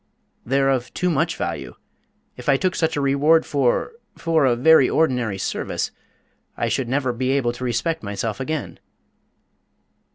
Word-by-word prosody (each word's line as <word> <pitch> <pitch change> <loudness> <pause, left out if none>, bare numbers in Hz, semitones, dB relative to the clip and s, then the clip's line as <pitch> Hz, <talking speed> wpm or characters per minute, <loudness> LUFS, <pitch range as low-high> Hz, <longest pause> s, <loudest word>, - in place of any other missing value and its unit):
"They're 135 +2 +2
of 125 -2 -2
too 180 0 0
much 165 +2 0
value. - - -4 0.6
If - - -5
I 135 - +5
took 185 +4 0
such 160 -1 0
a - - 0
reward 145 +4 +3
for 140 - +1 0.3
for 165 -3 +2
a 125 -2 +3
very 140 +1 +5
ordinary 125 -10 +1
service, 95 - -3 0.7
I - - -1
should 130 -3 -1
never 130 -1 0
be 130 +2 -2
able 135 -3 +1
to 125 - -8
respect 130 +7 -1
myself 105 +2 -4
again." 155 +3 -4
135 Hz, 155 wpm, -22 LUFS, 125-160 Hz, 0.7 s, I